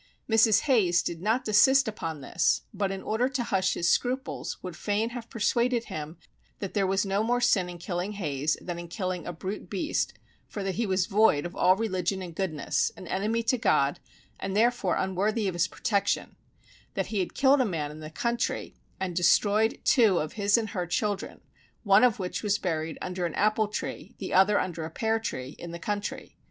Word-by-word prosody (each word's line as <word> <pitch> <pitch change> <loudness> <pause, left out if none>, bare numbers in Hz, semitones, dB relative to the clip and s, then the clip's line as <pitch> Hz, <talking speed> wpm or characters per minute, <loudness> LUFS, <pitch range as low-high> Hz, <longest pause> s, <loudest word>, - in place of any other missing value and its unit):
Mrs. 225 -2 +5
Hayes 190 - +3
did 170 -1 -4
not 225 +6 +1
desist 265 +5 +5
upon 165 -8 -4
this, 135 - +1
but 200 -1 -1
in 195 0 -5
order 240 +4 0
to 265 -3 -2
hush 190 -4 +1
his 170 - 0
scruples 255 +7 -1
would 180 -2 -6
fain 210 +5 -1
have 235 -2 -7
persuaded 235 +2 +1
him 155 -4 -7 0.4
that 195 - -5
there 200 -2 +1
was 195 +1 +1
no 195 +1 0
more 240 +2 +1
sin 200 -7 +2
in 175 - -7
killing 180 +3 -3
Hayes 150 -6 -1
than 175 -1 -5
in 175 - -7
killing 185 -1 -4
a - - -2
brute 185 +2 -6
beast 195 - -1 0.3
for 205 - -5
that 195 -1 -1
he 230 +3 -1
was 185 -1 +1
void 200 -8 +3
of 175 - -6
all 185 +1 +4
religion 190 -3 -1
and 175 -2 -8
goodness, 160 -5 -1
an - - -9
enemy 220 +4 0
to 250 +2 +1
God, 140 -8 +2 0.4
and 195 +1 -3
therefore 235 -4 +2
unworthy 200 +3 0
of 185 - -1
his 175 +2 +1
protection; 200 -3 -1 0.6
that - - 0
he 205 - +1
had 185 - -2
killed 275 0 +4
a - - +4
man 160 -9 -2
in 155 - -10
the 155 0 -7
country, 235 +8 -2 0.3
and 185 -2 -3
destroyed 205 +5 +3
two 220 - +4
of 155 -1 -2
his 205 0 +3
and 220 -2 -2
her 180 -3 -3
children, 205 +3 -2 0.4
one 200 0 +5
of 245 -4 +4
which 185 -2 -3
was 210 -1 +1
buried 160 -5 -3
under 180 -1 -2
an 165 - -7
apple 215 +1 +2
tree, 210 - -6
the - - -5
other 195 +2 +5
under 170 -3 -3
a 160 - -4
pear 220 +6 0
tree, 135 - -5
in 170 - -7
the 170 - -6
country. 205 +3 -4
195 Hz, 200 wpm, -27 LUFS, 175-220 Hz, 0.6 s, Mrs